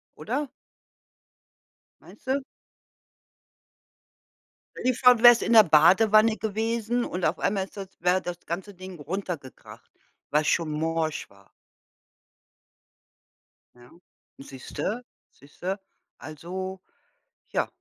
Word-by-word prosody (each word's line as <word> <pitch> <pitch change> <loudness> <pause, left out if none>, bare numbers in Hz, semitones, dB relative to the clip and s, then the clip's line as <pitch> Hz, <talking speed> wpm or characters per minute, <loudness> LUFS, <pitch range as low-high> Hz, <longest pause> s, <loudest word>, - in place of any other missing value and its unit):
oder? 255 - -3 1.5
Meinste? 270 +2 -4 2.4
Stell 255 - +1
dir - - -6
vor 250 0 +6
du 230 - -6
wärst 240 -1 +8
in 235 - +1
der 220 - +10
Badewanne 215 +7 +5
gewesen 225 +2 -2
und 180 0 -4
auf 155 - 0
einmal 195 -1 0
ist 195 - -14
das 195 -1 -6
wäre 180 +2 +2
das 175 -1 -7
ganze 190 +4 -6
Ding 185 -2 -10
runtergekracht, 165 -3 -7 0.4
weil's 150 +1 +1
schon 165 -2 +1
morsch 160 0 -2
war. 100 0 -22 2.3
Ja, 120 0 -18 0.5
siehste, 140 - -6 0.3
siehste, 180 +8 -7 0.4
also 180 +6 -7 0.7
ja. - - 0
185 Hz, 100 wpm, -26 LUFS, 160-220 Hz, 2.4 s, der